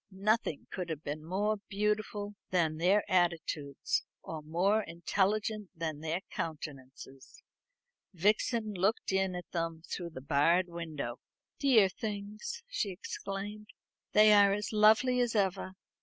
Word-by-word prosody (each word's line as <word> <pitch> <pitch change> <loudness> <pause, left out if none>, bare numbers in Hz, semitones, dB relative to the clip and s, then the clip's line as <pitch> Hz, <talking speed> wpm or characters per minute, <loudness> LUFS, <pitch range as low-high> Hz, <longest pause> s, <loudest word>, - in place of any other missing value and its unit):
Nothing 200 -4 0
could 180 -2 -4
be 145 - -2
more 190 +8 -1
beautiful 210 0 -1 0.2
than 160 -4 +1
their 190 +5 +3
attitudes, 165 -5 0 0.2
or 160 -1 -6
more 180 +8 +2
intelligent 200 +4 -1
than 160 -3 -3
their 160 +3 -2
countenances. 135 -4 -7 0.7
Vixen 210 +4 +1
looked 195 +4 0
in 190 -1 +1
at 180 - -7
them 165 -2 -3
through 175 -2 -4
the 155 - -8
barred 165 +6 +3
window. 155 -8 -5 0.4
"Dear 240 -8 +6
things," 210 - -5
she 220 - -1
exclaimed; 200 +2 -6 0.5
"they 215 0 +7
are 200 -1 +6
as 210 +2 -3
lovely 220 +4 +5
as 240 -2 +1
ever. 190 -2 0
190 Hz, 125 wpm, -32 LUFS, 165-210 Hz, 0.7 s, they